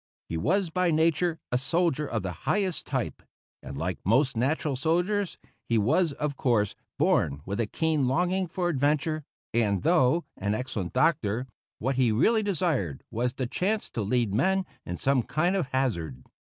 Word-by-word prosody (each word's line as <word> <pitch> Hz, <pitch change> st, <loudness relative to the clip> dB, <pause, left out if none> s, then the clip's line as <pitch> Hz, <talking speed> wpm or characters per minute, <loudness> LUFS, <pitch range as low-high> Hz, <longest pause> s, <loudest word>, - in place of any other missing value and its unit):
He 80 Hz, -, -3 dB
was 175 Hz, -, +1 dB
by 180 Hz, 0 st, +2 dB
nature 165 Hz, +1 st, +2 dB
a 125 Hz, -, +2 dB
soldier 150 Hz, +1 st, +1 dB
of 110 Hz, -4 st, -2 dB
the 95 Hz, -, -2 dB, 0.2 s
highest 190 Hz, -4 st, 0 dB
type, -, -, -2 dB, 0.4 s
and, 70 Hz, +1 st, -7 dB
like 80 Hz, 0 st, -2 dB
most 130 Hz, +7 st, +3 dB
natural 140 Hz, +5 st, 0 dB
soldiers, 175 Hz, +8 st, 0 dB, 0.3 s
he 115 Hz, -, +3 dB
was, 155 Hz, -, +3 dB
of 145 Hz, 0 st, -3 dB
course, 115 Hz, -7 st, +1 dB, 0.2 s
born 70 Hz, 0 st, +2 dB
with 100 Hz, +3 st, -3 dB
a 115 Hz, -, +1 dB
keen 155 Hz, 0 st, +1 dB
longing 180 Hz, +7 st, +1 dB
for 175 Hz, +1 st, -2 dB
adventure; 150 Hz, +1 st, +1 dB, 0.3 s
and, 105 Hz, -4 st, +1 dB
though 165 Hz, 0 st, +3 dB
an 100 Hz, +2 st, -1 dB
excellent 110 Hz, -7 st, -4 dB
doctor, 130 Hz, -8 st, +2 dB, 0.3 s
what 130 Hz, +3 st, -1 dB
he 125 Hz, -4 st, +3 dB
really 215 Hz, -, +3 dB
desired 160 Hz, -, -1 dB
was 120 Hz, +2 st, -1 dB
the 130 Hz, -, -2 dB
chance 195 Hz, -, -1 dB
to 115 Hz, -, -3 dB
lead 110 Hz, 0 st, +1 dB
men 190 Hz, -, +2 dB, 0.2 s
in 90 Hz, -, -3 dB
some 135 Hz, +4 st, +2 dB
kind 175 Hz, +10 st, 0 dB
of 180 Hz, -8 st, 0 dB
hazard. 85 Hz, -, -2 dB
135 Hz, 165 wpm, -27 LUFS, 110-170 Hz, 0.4 s, most